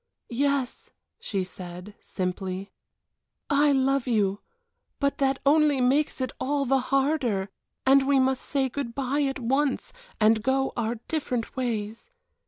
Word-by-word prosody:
"Yes," 280 0 -1 0.3
she 195 -3 -2
said, 180 +2 -9
simply, 185 +1 -4 0.8
"I 290 +1 +4
love 270 -1 +2
you, 205 -4 +1 0.6
but 280 +1 0
that 270 -1 +2
only 295 -1 +4
makes 275 +5 +2
it 255 - -1
all 280 +1 0
the 270 +1 +3
harder 265 -8 +1 0.4
and 270 +1 +5
we 280 -1 +4
must 265 0 +2
say 275 -2 0
good 245 -3 -5
bye 275 +2 0
at 275 -1 0
once, 270 +3 0 0.3
and 220 0 +4
go 265 +3 +1
our 235 -1 -1
different 255 -7 -2
ways. 230 - -3
265 Hz, 135 wpm, -26 LUFS, 220-280 Hz, 0.8 s, and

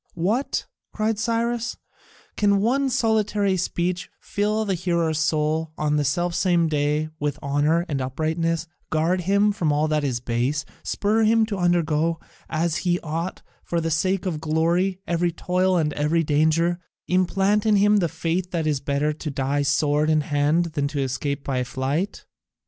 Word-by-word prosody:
"What!" 210 +11 0 0.3
cried 215 -1 0
Cyrus, 235 +1 -1 0.6
"can 200 -1 +3
one 265 +6 +1
solitary 215 -4 +1
speech 180 0 -2
fill 210 +2 -1
the 195 - 0
hearer's 170 -3 0
soul 155 0 0
on 150 0 +1
the 150 - +1
selfsame 175 +3 +1
day 150 +1 0
with 145 -1 -1
honour 150 +4 +1
and 140 -4 -2
uprightness, 160 +5 -1 0.2
guard 165 +4 +1
him 200 +3 +3
from 175 -7 0
all 150 +1 +2
that 155 -1 +1
is 130 -4 -1
base, 125 +4 -1 0.2
spur 215 +2 0
him 225 0 +4
to 210 -2 -4
undergo, 165 -2 +1 0.3
as 165 0 0
he 175 -1 0
ought, 165 +3 -4 0.2
for 170 - -1
the 165 0 -2
sake 185 +4 0
of 160 -5 -2
glory 170 +4 +1
every 170 +1 0
toil 180 +2 +1
and 150 -3 0
every 155 +3 +1
danger, 160 +3 +2 0.3
implant 195 +4 +2
in 215 - +5
him 205 +1 +4
the 175 -4 +1
faith 175 +3 -2
that 170 -3 -2
it - - +2
is 145 - -1
better 140 +2 0
to 150 +1 -6
die 140 +1 -1
sword 145 +2 +2
in 155 -1 +3
hand 150 +4 +1
than 145 -2 0
to 145 0 -4
escape 140 +2 -2
by 130 -2 -1
flight? 135 +9 -3
165 Hz, 165 wpm, -23 LUFS, 150-185 Hz, 0.6 s, in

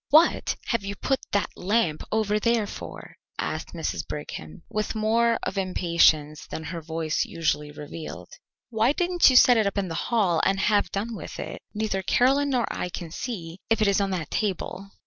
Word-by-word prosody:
"What 315 +4 +4
have 230 -4 0
you 200 +1 -4
put 270 +4 0
that 205 - 0
lamp 185 -5 +1
over 215 -1 +1
there 230 -1 +2
for?" - - -9 0.2
asked - - -4
Mrs. - - -2
Brigham, 80 0 -7
with 215 +1 -2
more 230 +2 +2
of 195 - -2
impatience 170 -5 +2
than 160 - -6
her 165 +2 -5
voice 160 0 -1
usually 150 -3 -1
revealed. 150 +2 -8 0.4
"Why 225 +4 +3
didn't 355 0 +4
you 260 - +2
set 250 -1 +8
it 210 -3 +2
in 195 -2 0
the - - -4 0.2
hall 195 -9 +2
and 195 0 +2
have 205 +1 +2
done 220 +4 -3
with - - -8
it? - - -6
Neither 210 -3 -1
Caroline 270 +8 +3
nor 250 -3 +2
I 180 - -3
can 170 -2 -6
see 175 -6 -5
if 225 0 +3
it 215 - +3
is 200 0 +3
on 195 - 0
that 175 -5 -3
table." 195 -1 -2
200 Hz, 185 wpm, -26 LUFS, 170-230 Hz, 0.4 s, set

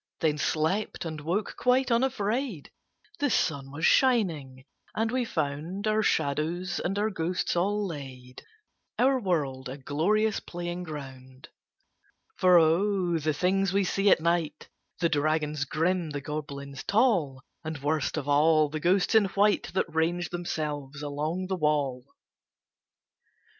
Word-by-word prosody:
Then 150 -2 +1
slept, 165 +7 -1
and 155 -2 -5
woke 180 +7 -2
quite 250 0 +2
unafraid. 235 - -1 0.5
The 290 0 +1
sun 140 - 0
was 150 +5 -2
shining, 160 - +2 0.3
and 225 +1 0
we 255 -1 0
found 160 +3 -3
Our 215 0 +2
shadows 165 +2 0
and 195 +3 -2
our 215 +1 0
ghosts 180 -1 -2
all 205 +4 +1
laid, 130 -6 -8 0.6
Our 265 +1 +3
world 140 - -2
a 135 - -6
glorious 195 +11 +1
playing 175 0 -5
ground. 130 -4 -9 0.9
For 180 -1 +5
O! 175 +1 +2
the 155 +1 0
things 190 +5 +1
we 200 0 +3
see 195 +2 +1
at - - +5
night 165 -2 -1 0.3
The 170 - +3
dragons 150 -1 0
grim, 165 +3 0
the 145 -1 -4
goblins 140 -2 -6
tall, 185 - +1 0.2
And, 160 -1 -4
worst 145 +1 -1
of 145 -2 -3
all, 155 +1 +4
the 155 +1 -4
ghosts 180 +6 +2
in 220 -2 +6
white 200 +1 +1
That - - +2
range 165 +2 0
themselves 150 -5 -4
along 150 +5 -2
the 190 0 -2
wall! 145 -6 0
165 Hz, 135 wpm, -28 LUFS, 145-195 Hz, 0.9 s, in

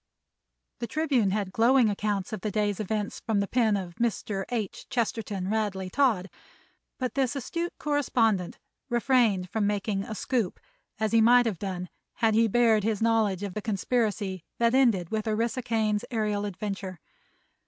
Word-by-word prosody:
The 235 - -3
Tribune 280 -10 +1
had 200 -1 -1
glowing 240 +3 +4
accounts 205 0 -1
of 210 - -4
the 215 - -2
day's 205 -1 0
events 210 0 -2
from 220 -3 0
the 200 - 0
pen 225 -3 +2
of 180 -3 -6
Mr. 210 -4 -1
H. 225 -5 -4
Chesterton 225 -6 -2
Radley 200 -3 -1
Todd, 230 -9 +2 0.7
but 255 -1 -2
this 270 0 0
astute 335 +6 -4
correspondent 230 - +1 0.3
refrained 235 -7 +2
from 215 -2 +1
making 205 -1 -1
"a 215 - -6
scoop," 230 -5 -1 0.4
as 220 0 0
he 230 -1 +5
might 245 +2 +6
have 210 -7 -2
done 185 -2 -4 0.3
had 225 -2 +2
he 225 +1 +4
bared 225 -1 +3
his 215 -1 0
knowledge 220 -4 +2
of 200 -2 -4
the 215 - -4
conspiracy 205 -3 -1
that 235 0 +2
ended 230 -10 +3
with 220 0 -2
Orissa 230 +4 0
Kane's 220 -3 0
aërial 210 -3 -1
adventure. 195 -2 -5
215 Hz, 160 wpm, -27 LUFS, 200-235 Hz, 0.7 s, might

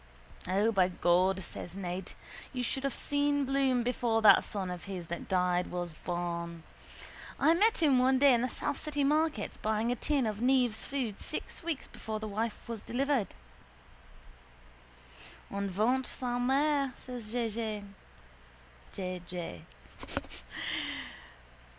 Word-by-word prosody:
—O, 200 +5 +3
by 190 -4 +4
God, 185 +1 +2
says 175 +1 -7
Ned, 185 -1 -4 0.4
you 250 -1 -2
should 265 +3 -1
have 275 - 0
seen 285 0 +1
Bloom 265 -2 +2
before 235 -2 +1
that 210 - +8
son 190 -3 -3
of 180 -1 -6
his 190 -3 -5
that 170 - -4
died 180 -1 +2
was 175 -2 -4
born. 170 0 -4 0.8
I 320 - +6
met 410 +1 +4
him 275 -5 +5
one 260 +1 +4
day 275 0 +7
in 235 - +3
the 250 - 0
south 275 - -2
city 295 -2 -1
markets 300 -5 +1
buying 220 +2 0
a - - +1
tin 275 +1 +1
of 215 0 -2
Neave's 250 -3 +2
food 255 -7 -2
six - - -5
weeks 330 -4 -3
before 220 -1 -5
the 215 - -4
wife 220 +2 -3
was 230 -3 -4
delivered. 270 -3 0 2.2
—En 200 0 -2
ventre 240 +7 +1
sa 245 -1 -2
mère, 275 +1 +2
says 245 -4 -7
J. 225 -3 -2 1.4
J. 170 - -5
230 Hz, 135 wpm, -31 LUFS, 190-265 Hz, 2.2 s, that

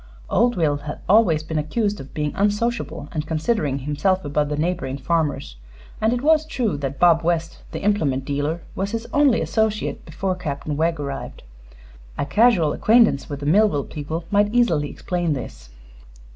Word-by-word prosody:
Old 240 +3 +3
Will 150 -4 +2
had 150 +1 -7
always 185 -7 +4
been 160 0 -2
accused 205 +7 -1
of 135 - -10
being 150 -1 -1
unsociable 210 -6 -1
and 155 -2 -3
considering 155 - 0
himself 150 +7 0
above 145 0 0
the 150 - -2
neighboring 155 -4 -2
farmers; 145 - -1 0.4
and 220 +1 +3
it 245 +1 -1
was 310 0 +4
true 255 - -1
that 140 -1 -4
Bob 170 -2 +5
West, 165 -1 -1
the - - -6
implement 150 -11 +1
dealer, 145 +4 -2
was 195 +1 -2
his 230 0 -3
only 285 -5 +4
associate 220 -1 -1
before 185 +4 -3
Captain 150 -4 -4
Wegg 165 +1 0
arrived. 140 -1 -6 0.7
A - - -1
casual 180 - +3
acquaintance 220 - +3
with 145 -1 -5
the - - -4
Millville 175 -2 +3
people 160 +2 -5
might 205 0 +3
easily 195 -12 +2
explain 175 -3 -2
this. 65 - -7
165 Hz, 165 wpm, -22 LUFS, 145-210 Hz, 0.7 s, Bob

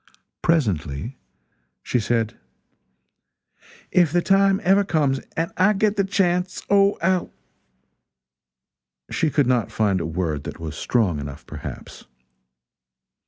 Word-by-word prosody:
Presently 105 - -1 0.6
she 125 - 0
said: 115 0 -1 1.6
"If 175 -5 +4
the 175 +1 +1
time 195 0 +3
ever 195 +2 +4
comes, 150 -8 +1 0.2
and 165 +1 -1
I 190 +4 +4
get 210 0 0
a - - +4
chance, 185 -2 0
Oh, 200 0 +4
I'll 185 0 +1 0.9
" 65 0 -34
She 160 - +1
could 145 -1 +2
not 125 -3 +1
find 100 -4 +1
a 80 - -3
word 80 -4 -2
that - - -7
was 80 -2 -6
strong 95 -5 0
enough, 70 -1 -8
perhaps. - - -9
135 Hz, 120 wpm, -23 LUFS, -, 1.6 s, If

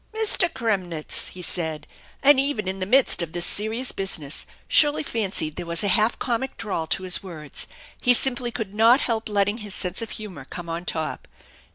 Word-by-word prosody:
"Mr. 420 -5 +3
Kremnitz," 185 -9 -1
he 180 - -8
said, 160 -3 -2 0.4
and 280 -1 +6
even 270 -8 -1
in 190 +1 -3
the 185 - -3
midst 260 -3 +4
of 165 -2 -5
this 175 0 0
serious 220 +5 +1
business 165 -6 -1 0.2
Shirley 295 0 +4
fancied 195 - -3
there - - -5
was 170 +2 -1
a 200 - +1
half 220 +2 +2
comic 255 +2 -3
drawl 175 -6 -3
to 190 - 0
his 185 -1 +2
words. 155 -6 -6 0.3
He 245 -1 +6
simply 245 -1 +3
could 225 -4 -6
not 230 +5 +5
help 225 -2 -2
letting 205 +2 +1
his 210 -3 -6
sense 180 +4 -1
of 225 - -5
humor 210 -4 -8
come 170 -1 -7
on 170 +2 -4
top. 160 -3 -3
205 Hz, 190 wpm, -24 LUFS, 175-240 Hz, 0.4 s, and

